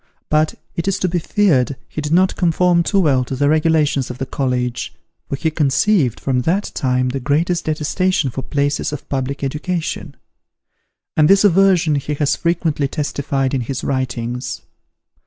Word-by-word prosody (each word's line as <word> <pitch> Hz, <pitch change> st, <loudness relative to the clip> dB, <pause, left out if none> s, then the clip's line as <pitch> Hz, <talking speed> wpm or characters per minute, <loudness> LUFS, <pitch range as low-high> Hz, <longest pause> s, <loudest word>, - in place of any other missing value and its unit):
But, 155 Hz, +1 st, +2 dB, 0.2 s
it 170 Hz, +2 st, -3 dB
is 195 Hz, 0 st, +1 dB
to 185 Hz, -, 0 dB
be 175 Hz, 0 st, 0 dB
feared, 155 Hz, -, +2 dB
he 155 Hz, -, -5 dB
did 150 Hz, 0 st, -4 dB
not 185 Hz, +3 st, +3 dB
conform 175 Hz, 0 st, +2 dB
too 195 Hz, +4 st, +1 dB
well 140 Hz, -8 st, +3 dB
to 130 Hz, -, -5 dB
the 145 Hz, +2 st, +1 dB
regulations 155 Hz, -3 st, +2 dB
of 125 Hz, -, -6 dB
the 135 Hz, -, -3 dB
college, 125 Hz, -3 st, -2 dB, 0.3 s
for -, -, -1 dB
he 160 Hz, +3 st, -1 dB
conceived, 150 Hz, -, +2 dB
from 130 Hz, -2 st, 0 dB
that 185 Hz, +9 st, 0 dB
time, 125 Hz, -1 st, 0 dB
the 135 Hz, +2 st, -3 dB
greatest 165 Hz, +6 st, 0 dB
detestation 160 Hz, 0 st, 0 dB
for 130 Hz, -, -4 dB
places 145 Hz, +2 st, -1 dB
of 150 Hz, -1 st, -7 dB
public 135 Hz, +1 st, -3 dB
education. 155 Hz, +1 st, -3 dB, 1.0 s
And 155 Hz, -1 st, +4 dB
this 195 Hz, +1 st, +6 dB
aversion 185 Hz, -4 st, +4 dB
he 145 Hz, +1 st, -2 dB
has 145 Hz, -1 st, +1 dB
frequently 165 Hz, -4 st, 0 dB
testified 140 Hz, -2 st, -2 dB
in 135 Hz, -, 0 dB
his 125 Hz, +2 st, -4 dB
writings. 125 Hz, -2 st, -3 dB
150 Hz, 165 wpm, -19 LUFS, 135-170 Hz, 1.0 s, this